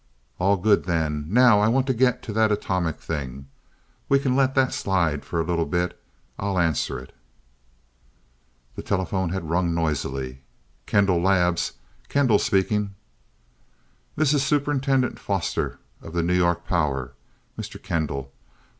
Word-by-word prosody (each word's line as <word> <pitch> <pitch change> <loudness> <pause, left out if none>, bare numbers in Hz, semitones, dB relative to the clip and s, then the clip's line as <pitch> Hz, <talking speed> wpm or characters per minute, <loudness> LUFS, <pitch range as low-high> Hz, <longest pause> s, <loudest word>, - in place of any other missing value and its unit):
"All 100 +2 +3
good 100 +2 +3
then. 80 -4 -1
Now 120 0 +6
I 105 - +3
want 130 +3 +2
to 130 - +1
get 125 0 +2
to 110 - -5
that 110 0 +3
atomic 90 -5 -1
thing. 70 -4 -5 0.6
We 140 - +5
can 135 -2 0
let 135 -1 +2
that 130 -1 +3
slide 85 -7 0
for 85 - -3
a - - +2
little 85 -1 -1
bit 90 +3 -1 0.4
I'll 100 -1 -1
answer 80 -4 +1
it." 65 +1 -11 1.6
The - - -5
telephone 95 -1 -1
had 85 -3 -4
rung 85 -1 +1
noisily. 70 -5 -2 0.5
"Kendall 95 -4 +3
Labs 90 -2 +2 0.4
Kendall 130 -7 +3
speaking." 100 +1 0 1.2
"This 150 -1 +2
is 145 - +2
Superintendent 135 -2 +1
Foster, - - -2 0.2
of 80 - -10
the 85 -1 0
New 90 +2 +1
York 85 -1 +1
Power, 70 -7 -1 0.4
Mr. - - -7
Kendall. 70 -4 -3
90 Hz, 140 wpm, -24 LUFS, 80-110 Hz, 1.6 s, Now